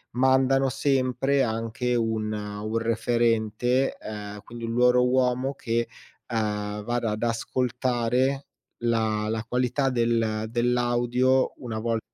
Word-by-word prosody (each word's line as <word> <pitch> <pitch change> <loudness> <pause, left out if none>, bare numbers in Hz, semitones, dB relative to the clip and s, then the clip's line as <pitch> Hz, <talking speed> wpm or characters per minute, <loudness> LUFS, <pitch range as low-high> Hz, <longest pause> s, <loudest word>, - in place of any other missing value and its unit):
mandano 130 +1 +3
sempre 135 +1 +1
anche 115 +2 -1
un 110 -2 0
un 105 +1 -4
referente, 115 +2 +1
ehm, 105 -1 -7
quindi 115 +1 -10
un 115 - -3
loro 125 +1 +4
uomo 130 +1 +1
che, 115 -2 -1 0.5
uhm, 105 -1 -2
vada 120 -1 -1
ad 105 +2 -3
ascoltare 125 +2 0 0.4
la 110 -2 +1
la 110 0 -2
qualità 125 +3 +1
del 115 -2 +1
dell'audio 120 +2 +2
una 115 -4 -5
vol 115 0 0
120 Hz, 115 wpm, -26 LUFS, 110-125 Hz, 0.5 s, loro